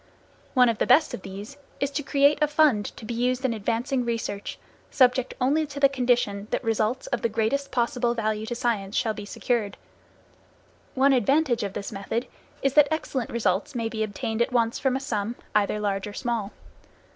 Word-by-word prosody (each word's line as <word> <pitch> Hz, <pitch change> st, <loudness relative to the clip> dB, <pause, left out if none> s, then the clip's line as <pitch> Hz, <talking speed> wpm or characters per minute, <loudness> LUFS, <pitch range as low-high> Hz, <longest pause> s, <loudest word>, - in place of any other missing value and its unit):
One 250 Hz, -1 st, +6 dB
of 230 Hz, -2 st, 0 dB
the -, -, +1 dB
best 275 Hz, +6 st, +5 dB
of -, -, -5 dB
these 200 Hz, +8 st, -9 dB, 0.2 s
is 280 Hz, 0 st, 0 dB
to 290 Hz, -, -2 dB
create 285 Hz, +1 st, +3 dB
a 300 Hz, -, +4 dB
fund 295 Hz, -9 st, +3 dB
to 225 Hz, -, -9 dB
be 235 Hz, -, -4 dB
used 250 Hz, +2 st, 0 dB
in 250 Hz, -, +1 dB
advancing 235 Hz, +5 st, -1 dB
research, 230 Hz, -4 st, -3 dB, 0.3 s
subject 255 Hz, -1 st, +3 dB
only 295 Hz, +5 st, +2 dB
to 285 Hz, 0 st, -7 dB
the 280 Hz, -, +7 dB
condition 240 Hz, -6 st, 0 dB
that -, -, -2 dB
results 225 Hz, +2 st, 0 dB
of 240 Hz, -, 0 dB
the 230 Hz, -, +1 dB
greatest 230 Hz, +6 st, 0 dB
possible 240 Hz, -1 st, 0 dB
value 215 Hz, -1 st, -1 dB
to 240 Hz, -, -3 dB
science 225 Hz, -5 st, -1 dB
shall 225 Hz, -3 st, +1 dB
be 210 Hz, -1 st, -7 dB
secured. 210 Hz, -1 st, -2 dB, 1.2 s
One 270 Hz, +1 st, +4 dB
advantage 265 Hz, +1 st, +2 dB
of 200 Hz, -2 st, -3 dB
this 200 Hz, -, -5 dB
method 220 Hz, +5 st, -3 dB, 0.4 s
is 275 Hz, -1 st, +2 dB
that 295 Hz, -1 st, +6 dB
excellent 280 Hz, -6 st, -2 dB
results 210 Hz, -1 st, -1 dB
may 230 Hz, -2 st, -1 dB
be 220 Hz, -1 st, -4 dB
obtained 220 Hz, +2 st, -2 dB
at 235 Hz, -, +1 dB
once 230 Hz, -2 st, +1 dB
from 265 Hz, -2 st, +1 dB
a -, -, 0 dB
sum, 225 Hz, -4 st, -3 dB, 0.2 s
either 210 Hz, 0 st, +1 dB
large 200 Hz, -1 st, -1 dB
or 205 Hz, -, -7 dB
small. 230 Hz, -3 st, -2 dB
235 Hz, 190 wpm, -25 LUFS, 215-265 Hz, 1.2 s, the